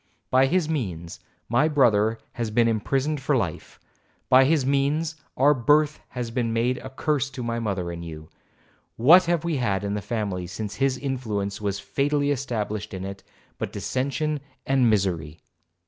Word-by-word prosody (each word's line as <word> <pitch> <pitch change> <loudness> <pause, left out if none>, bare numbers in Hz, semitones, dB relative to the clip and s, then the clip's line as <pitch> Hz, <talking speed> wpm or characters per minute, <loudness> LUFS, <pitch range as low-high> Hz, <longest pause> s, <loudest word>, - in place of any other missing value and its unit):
By 130 +1 +5
his 175 +1 +1
means 90 - -4 0.3
my 120 +7 +3
brother 115 -7 +3
has 115 -2 -3
been 115 +2 +3
imprisoned 135 +6 0
for 135 0 +2
life;—by 130 +6 -1
his 145 -2 +2
means 145 +4 +1 0.2
our 145 +3 +5
birth 150 +4 +3
has 120 -2 -5
been 115 -1 -1
made 120 +3 0
a 130 - -8
curse 135 0 -1
to 130 -2 -6
my 115 0 -2
mother 95 -6 -2
and 85 0 -6
to 85 - -7
you. 80 -1 -9 0.7
What 160 +11 +7
have 170 -2 +1
we 170 -3 -1
had 100 -6 0
in 100 0 -2
the 105 - -2
family 100 -6 -3
since 100 +3 -6
his 135 -1 +1
influence 110 -8 -3
was 100 -1 -2
fatally 145 +5 0
established 110 -7 -3
in 95 0 -5
it, 100 0 -7 0.4
but - - -3
dissension 140 +3 -2 0.3
and 135 -3 +3
misery? 85 -7 0
120 Hz, 165 wpm, -25 LUFS, 105-140 Hz, 0.7 s, What